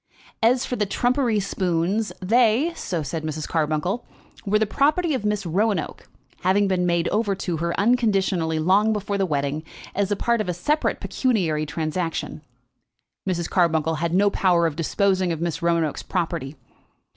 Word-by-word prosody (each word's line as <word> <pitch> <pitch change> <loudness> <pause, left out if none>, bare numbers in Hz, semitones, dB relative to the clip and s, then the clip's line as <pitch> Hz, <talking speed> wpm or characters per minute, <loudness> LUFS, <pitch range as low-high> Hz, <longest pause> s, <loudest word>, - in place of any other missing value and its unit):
As 245 +3 +3
for 250 - -3
the 210 - 0
trumpery 245 0 +1
spoons, 190 +2 -1
they, 235 - +3
so 175 - -3
said 155 +3 -4
Mrs. 155 0 -4
Carbuncle, 160 +7 -1 0.4
were 210 +2 +3
the 220 - +2
property 305 - +1
of 255 - -2
Miss 210 -2 0
Roanoke, 190 0 -1 0.3
having 195 +3 +2
been 180 -2 +1
made 170 -1 +1
over 210 -2 0
to 180 -3 -3
her 170 +2 -2
unconditionally 195 -8 +2
long 195 +7 +3
before 200 -1 -2
the 195 - +1
wedding, 145 0 -1 0.3
as 200 0 0
a - - +3
part 235 +2 +1
of 210 - -3
a 180 - -1
separate 295 - 0
pecuniary 170 - 0
transaction. 160 +2 -3 0.9
Mrs. 170 -2 -1
Carbuncle 160 -3 +2
had 170 -1 0
no 200 +1 +4
power 175 -4 +3
of 160 -3 -1
disposing 185 +2 +1
of 165 - -3
Miss 170 0 -2
Roanoke's 170 -3 0
property. 165 -6 -3
185 Hz, 160 wpm, -23 LUFS, 165-210 Hz, 0.9 s, no